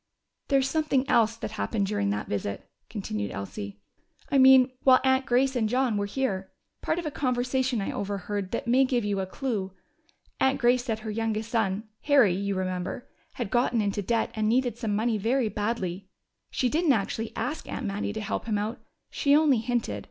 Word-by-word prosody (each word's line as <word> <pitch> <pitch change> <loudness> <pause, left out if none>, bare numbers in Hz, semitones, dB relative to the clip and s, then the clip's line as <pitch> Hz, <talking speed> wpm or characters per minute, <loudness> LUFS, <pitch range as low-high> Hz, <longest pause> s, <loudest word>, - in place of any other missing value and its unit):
"There's 270 -2 +3
something 295 -4 +1
else 225 -1 +3
that 220 - -5
happened 215 -1 -1
during 195 - -1
that 105 +1 -2
visit," 100 -1 -4 0.2
continued 105 - -4
Elsie. 100 +1 -6 0.5
"I 275 - +4
mean, 260 -1 +7
while 260 -1 +6
Aunt 265 -1 +2
Grace 260 +2 +2
and 220 -3 +1
John 250 -1 +1
were 205 0 -1
here. 200 -5 -2 0.3
Part 315 - -1
of 345 - -3
a 305 - -2
conversation 250 -2 0
I - - -2
overhead 200 0 -3
that 230 - -3
may 250 +3 +4
give 250 -4 0
you 200 -1 0
a 190 - -2
clue. 200 -4 -3 0.7
Aunt 265 0 +2
Grace 245 +1 +3
said 225 -4 -1
her 215 -1 -4
youngest 225 0 -2
son 210 -3 0 0.2
Harry, 275 -10 +5
you 200 +1 -2
remember 185 +4 -3 0.3
had 235 -6 -4
gotten 240 -1 +2
into 205 -1 0
debt 225 +3 0
and 215 -1 0
needed 245 0 +1
some 225 -4 -2
money 220 0 0
very 235 +2 +1
badly. 200 -4 -3 0.4
She 255 - 0
didn't 310 +3 +3
actually 220 +1 -2
ask 255 +7 -4
Aunt 265 - -4
Mattie 205 0 -2
to 220 +1 -5
help 210 - -3
him 215 -2 +1
out: 210 +3 -3 0.3
she 280 0 +3
only 295 -5 +4
hinted. 240 +1 -2
225 Hz, 190 wpm, -27 LUFS, 200-260 Hz, 0.7 s, mean